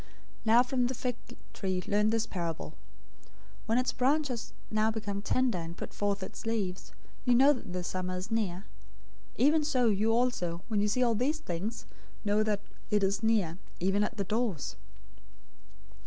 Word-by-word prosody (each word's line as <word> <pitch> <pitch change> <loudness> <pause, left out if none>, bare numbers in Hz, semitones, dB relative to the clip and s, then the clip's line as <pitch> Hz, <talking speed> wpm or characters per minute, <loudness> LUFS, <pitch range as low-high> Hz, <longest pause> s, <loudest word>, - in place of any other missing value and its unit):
024:032 - - -24 0.4
"Now 230 +2 +6
from 250 -1 +1
the 255 - -2
fig 245 0 -2 0.4
tree 185 -2 -2
learn 210 +1 +3
this 225 0 +1
parable. 165 -3 -4 0.9
When 225 +2 +3
its 255 0 +1
branch 285 +3 +2
has 240 -3 -4 0.2
now 215 0 +3
become 210 -2 -3
tender, 245 -2 +1
and 165 +1 -6
puts - - -7
forth 200 -1 0
its - - -7
leaves, 185 - -2 0.3
you 250 -2 +4
know 275 +4 +7
that 250 - -7
the 180 0 -3
summer 185 +1 -2
is 185 +5 -6
near. 200 -4 -1 0.7
024:033 - - +4
Even 305 +1 +5
so 260 -5 +2
you 215 +2 +2
also, 225 -8 0
when 215 -2 +1
you 210 - +2
see 250 +5 +2
all 235 -2 +3
these 260 +8 +1
things, 210 - -4 0.4
know 205 +1 +3
that 215 -2 +1 0.3
it 210 -1 +2
is 195 +2 +1
near, 205 -7 +1 0.2
even 195 +3 +2
at 230 +2 -3
the 200 - 0
doors. 210 - -1
215 Hz, 180 wpm, -31 LUFS, 190-245 Hz, 0.9 s, know